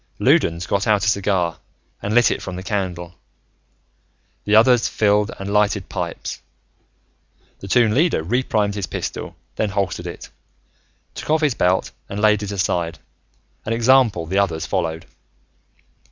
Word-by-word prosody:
Loudons 85 +1 +2
got 100 +3 -1
out 105 -2 +3
a - - 0
cigar 95 -4 0 0.4
and 105 +2 -2
lit 120 0 +5
it - - -2
from 95 - -6
the 90 - -6
candle; 90 -4 -3 1.3
the 105 - +3
others 120 +1 +5
filled 105 0 +2
and 100 +1 -5
lighted 105 -3 +1
pipes. - - -5 1.2
The 100 - -9
Toon 110 +1 +3
Leader 155 - +2
reprimed 105 0 0
his 100 -3 -4
pistol, - - -5 0.2
then 110 - 0
holstered 95 -3 -2
it, 85 - -9 0.8
took - - -8
off 155 +1 +3
his 150 -4 +2
belt 90 -3 +1 0.2
and 100 - -4
laid 105 0 +3
it 105 -1 -4
aside, 90 -4 -1 0.7
an 110 - -2
example 115 -6 +3
the 95 +4 0
others 80 -5 0
followed. 80 -2 -2
100 Hz, 145 wpm, -21 LUFS, 90-110 Hz, 1.3 s, lit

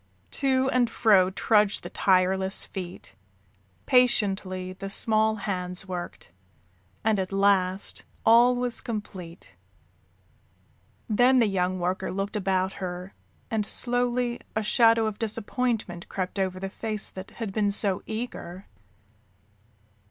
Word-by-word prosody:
To 265 -1 +1
and 245 -2 +2
fro 200 -5 +4
trudged 210 +1 +2
the - - -6
tireless 190 +1 +2
feet, 185 -2 -8 0.7
patiently 195 -7 +1
the 195 +1 -7
small 220 +1 +3
hands 180 -3 -4
worked, 175 - -7 0.7
and 215 -2 +2
at 185 0 -3
last 195 -1 +1 0.2
all 240 +2 +6
was 245 -1 -1
complete. 185 - -7 1.5
Then 245 +4 +4
the 240 - +5
young 185 -2 0
worker 180 +2 -2
looked 195 +2 -3
about 190 -1 0
her, 180 +1 -5 0.4
and 220 -2 +1
slowly 245 +1 -1 0.2
a 220 - 0
shadow 225 0 +4
of 215 -1 -3
disappointment 225 -4 -2
crept 185 +1 -3
over 185 -1 -1
the 195 0 -4
face 215 -1 -2
that 190 +1 -9
had 220 -4 -4
been 210 -1 +1
so 200 -2 +1
eager. 200 -5 -6
200 Hz, 120 wpm, -26 LUFS, 185-225 Hz, 1.5 s, all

